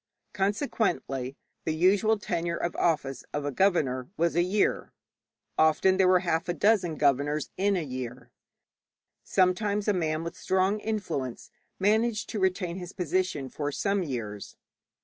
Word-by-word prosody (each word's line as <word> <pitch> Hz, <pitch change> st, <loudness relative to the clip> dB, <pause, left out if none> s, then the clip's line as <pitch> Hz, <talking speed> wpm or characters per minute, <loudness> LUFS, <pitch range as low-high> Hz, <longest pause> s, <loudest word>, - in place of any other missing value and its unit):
Consequently 195 Hz, -, -1 dB, 0.3 s
the 160 Hz, -, -1 dB
usual 200 Hz, +6 st, +3 dB
tenure 170 Hz, -4 st, -2 dB
of 175 Hz, -, -2 dB
office 145 Hz, -6 st, 0 dB
of 145 Hz, -1 st, -2 dB
a 145 Hz, -, -1 dB
governor 135 Hz, -7 st, +1 dB
was 170 Hz, 0 st, +1 dB
a 175 Hz, -, +4 dB
year. 190 Hz, +4 st, 0 dB, 0.7 s
Often 160 Hz, +4 st, +4 dB
there 190 Hz, -1 st, +4 dB
were 185 Hz, -1 st, +5 dB
half 170 Hz, -1 st, -1 dB
a 175 Hz, -, 0 dB
dozen 195 Hz, -6 st, +2 dB
governors 145 Hz, +1 st, +1 dB
in 200 Hz, +1 st, +2 dB
a 170 Hz, -, -1 dB
year; 125 Hz, -3 st, -6 dB, 0.9 s
sometimes 200 Hz, +3 st, +1 dB
a 210 Hz, -, +4 dB
man 160 Hz, -3 st, -1 dB
with 170 Hz, -, -5 dB
strong 190 Hz, +3 st, +1 dB
influence 180 Hz, -, -4 dB, 0.3 s
managed 215 Hz, +3 st, +1 dB
to 215 Hz, -, -3 dB
retain 185 Hz, -2 st, 0 dB
his 180 Hz, 0 st, -7 dB
position 180 Hz, -5 st, -1 dB
for 145 Hz, +3 st, -3 dB
some 200 Hz, +6 st, 0 dB
years. 115 Hz, -, -5 dB
175 Hz, 145 wpm, -28 LUFS, 145-195 Hz, 0.9 s, were